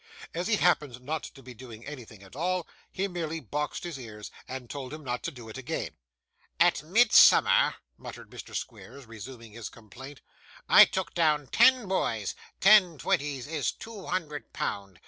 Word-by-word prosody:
As 175 +2 -3
he 220 - +3
happened 150 - +1
not 155 +3 -3
to 135 - -13
be 125 0 -10
doing 120 -1 -12
anything 120 -8 -10
at 95 +4 -15
all, 180 +3 -1 0.2
he 195 +1 -2
merely 165 -3 -4
boxed 150 +3 -4
his 170 -6 -6
ears, 105 -4 -9 0.2
and 130 -1 -7
told 130 0 -7
him 155 0 -8
not 125 -2 -3
to - - -1
do 120 -6 -12
it 110 +4 -8
again. 135 - -4 0.7
'At 175 0 +4
Midsummer,' 220 +9 +5 0.2
muttered - - -10
Mr. - - -10
Squeers, 135 +2 -7
resuming 115 +1 -10
his 115 0 -7
complaint, 130 +6 -13 0.5
'I - - +9
took 190 -1 -4
down 155 -4 +2
ten 255 -5 +5
boys; 115 - -1 0.3
ten 190 -5 +6
twenties 140 -2 -1
is 145 -5 -1
two 220 -4 -10
hundred 150 -5 -4
pound. 100 -3 -4
145 Hz, 165 wpm, -28 LUFS, 120-175 Hz, 0.7 s, I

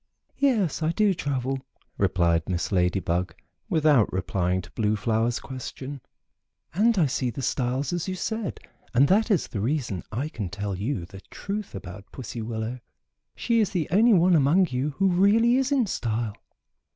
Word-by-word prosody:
"Yes, 220 - +2
I 155 +1 +1
do 210 0 +3
travel," 135 -4 -2 0.4
replied 85 -2 +2
Miss 85 -2 -1
Lady 90 0 +2
Bug, 90 0 -2 0.3
without 150 - +3
replying 90 0 0
to 90 - -14
Blue 110 -1 0
Flower's 115 +3 0
question, 130 +1 -7 0.7
"and 220 +5 +3
I 170 - +4
see 130 -1 -1
the 125 +3 -6
styles, 130 +4 -1
as 175 0 -2
you 185 - -2
said, 220 +2 -3 0.4
and 135 +4 +6
that 215 +5 +3
is 195 -7 +2
the 100 - -3
reason 120 - -1
I 130 +7 -2
can 105 - -5
tell 100 0 -4
you 100 0 -3
the 95 +2 -12
truth 205 +1 -5
about 100 0 -9
Pussy 120 -2 -6
Willow. 110 +2 -4 0.6
She 235 -1 +1
is 215 - +2
the 180 -6 -1
only 220 +6 +5
one 180 -1 +5
among 165 +4 +4
you 130 +4 -1
who 195 - +2
really 210 +7 +4
is 270 +1 0
in 270 -4 +3
style." 115 - -2
135 Hz, 170 wpm, -26 LUFS, -, 0.7 s, and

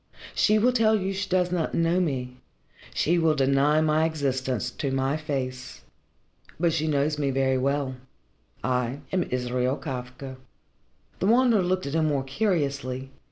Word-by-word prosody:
"She 215 0 +3
will 240 +4 +4
tell 220 -2 +4
you 190 0 -2
she 195 0 -3
does 180 -1 +2
not 175 -3 -1
know 170 +2 +2
me 130 -7 -2 0.5
she 170 +3 +1
will 160 -2 +3
deny 140 +2 +3
my 155 0 +2
existence 130 - -1
to 140 - -3
my 135 +1 0
face. 130 -4 -4 0.8
But 170 -1 +2
she 155 -1 0
knows 150 0 +1
me 140 -2 +1
very 130 -1 +1
well. 135 -1 -1 0.7
I 125 +1 -1
am 185 - +1
Israel 125 +1 0
Kafka." 130 0 -6 0.8
The 190 - +1
Wanderer 235 -2 +4
looked 185 +1 0
at 140 - -4
him 160 -1 +2
more 140 -3 0
curiously. 140 -6 -1
145 Hz, 155 wpm, -26 LUFS, 130-170 Hz, 0.8 s, will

